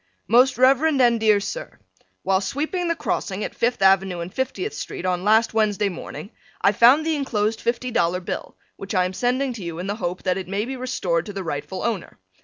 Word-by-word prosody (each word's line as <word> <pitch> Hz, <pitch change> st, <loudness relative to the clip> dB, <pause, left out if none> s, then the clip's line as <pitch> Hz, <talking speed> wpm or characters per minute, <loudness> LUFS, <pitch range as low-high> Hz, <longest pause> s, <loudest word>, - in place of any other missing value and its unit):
Most 250 Hz, +2 st, +4 dB
Rev. 260 Hz, +2 st, +5 dB
and 260 Hz, -7 st, +3 dB
dear 215 Hz, -2 st, +4 dB
Sir: -, -, -6 dB, 0.5 s
While 190 Hz, 0 st, +2 dB
sweeping 310 Hz, -, -2 dB
the 335 Hz, -, +1 dB
crossing 200 Hz, -9 st, -3 dB
at -, -, -4 dB
Fifth 235 Hz, -4 st, 0 dB
Avenue 190 Hz, -2 st, +3 dB
and 170 Hz, +2 st, -6 dB
50th 275 Hz, +11 st, -3 dB
street 185 Hz, -, -6 dB
on 180 Hz, -1 st, 0 dB
last 220 Hz, +3 st, +3 dB
Wednesday 210 Hz, -2 st, +1 dB
morning, 190 Hz, +2 st, -8 dB, 0.3 s
I 200 Hz, -, +4 dB
found 250 Hz, +9 st, +5 dB
the 320 Hz, -1 st, +1 dB
enclosed 220 Hz, -6 st, -1 dB
Fifty 245 Hz, +1 st, -1 dB
Dollar 180 Hz, -4 st, +1 dB
Bill, 185 Hz, -, -6 dB, 0.2 s
which 195 Hz, +1 st, -6 dB
I 180 Hz, -1 st, +3 dB
am 185 Hz, -, -3 dB
sending 250 Hz, +5 st, 0 dB
to 220 Hz, -5 st, -8 dB
you 170 Hz, -1 st, -5 dB
in 180 Hz, -, -5 dB
the 205 Hz, +2 st, -3 dB
hope 180 Hz, -4 st, -4 dB
that 185 Hz, 0 st, 0 dB
it 185 Hz, -, -7 dB
may 200 Hz, +3 st, -2 dB
be 265 Hz, +2 st, -5 dB
restored 185 Hz, -10 st, -2 dB
to 205 Hz, -, -6 dB
the 195 Hz, -1 st, -4 dB
rightful 150 Hz, +3 st, -4 dB
owner. 225 Hz, -7 st, -3 dB
210 Hz, 210 wpm, -23 LUFS, 190-255 Hz, 0.5 s, Rev